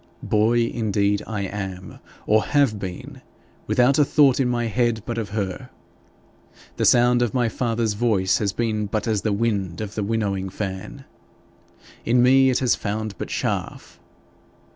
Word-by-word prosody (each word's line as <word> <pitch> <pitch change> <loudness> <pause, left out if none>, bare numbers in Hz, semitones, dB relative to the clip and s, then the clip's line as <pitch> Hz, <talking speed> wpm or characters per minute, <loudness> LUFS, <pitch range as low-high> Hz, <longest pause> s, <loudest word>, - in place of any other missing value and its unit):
Boy 110 +3 +2
indeed 105 -3 0
I 105 -2 -3
am 95 -2 -6 0.3
or 110 +1 +3
have 140 -8 +1
been 90 -2 -8 0.5
without 125 +4 +3
a - - +6
thought 140 -2 +3
in 130 -2 +1
my 120 -1 -1
head 115 -1 0
but 115 -1 -3
of 105 -4 -4
her. 100 -3 -4 1.1
The - - +1
sound 120 0 +4
of 120 -1 -1
my 120 -2 +2
father's 115 -2 -1
voice 100 -4 +1
has 100 -2 0
been 110 -1 -2
but 105 +2 -3
as 110 -3 0
the 110 - -1
wind 100 -5 -1
of 105 -1 -5
the 110 - -3
winnowing 100 -3 -2
fan. 95 -1 -6 1.0
In 120 +1 +3
me 130 +1 +5
it 125 - +1
has 125 -2 +2
found 110 0 -3
but - - -4
chaff. - - -4
110 Hz, 160 wpm, -22 LUFS, 100-120 Hz, 1.1 s, a